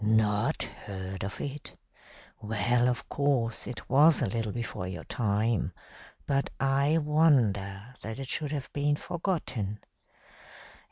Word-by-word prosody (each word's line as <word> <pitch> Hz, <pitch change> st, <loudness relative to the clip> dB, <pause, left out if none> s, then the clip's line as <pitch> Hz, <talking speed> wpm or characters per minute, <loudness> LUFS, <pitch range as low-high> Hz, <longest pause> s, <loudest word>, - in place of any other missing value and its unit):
Not 105 Hz, -1 st, +2 dB
heard 95 Hz, -1 st, -6 dB
of 100 Hz, -, -5 dB
it? 145 Hz, 0 st, -6 dB, 0.6 s
Well, 115 Hz, +3 st, +2 dB
of 125 Hz, -, -2 dB
course, 135 Hz, -5 st, 0 dB
it 125 Hz, -, -7 dB
was 150 Hz, +4 st, +6 dB
a -, -, +2 dB
little 115 Hz, +1 st, -2 dB
before 115 Hz, -5 st, -4 dB
your 90 Hz, -3 st, -6 dB
time, 110 Hz, -1 st, 0 dB, 0.5 s
but 140 Hz, -1 st, +1 dB
I 140 Hz, +3 st, +3 dB
wonder 125 Hz, -9 st, +2 dB
that 110 Hz, +1 st, -5 dB
it 135 Hz, -1 st, -5 dB
should 145 Hz, +2 st, -1 dB
have 145 Hz, -3 st, -4 dB
been 145 Hz, 0 st, +2 dB
forgotten. 150 Hz, -, -2 dB
120 Hz, 125 wpm, -29 LUFS, 105-145 Hz, 0.6 s, was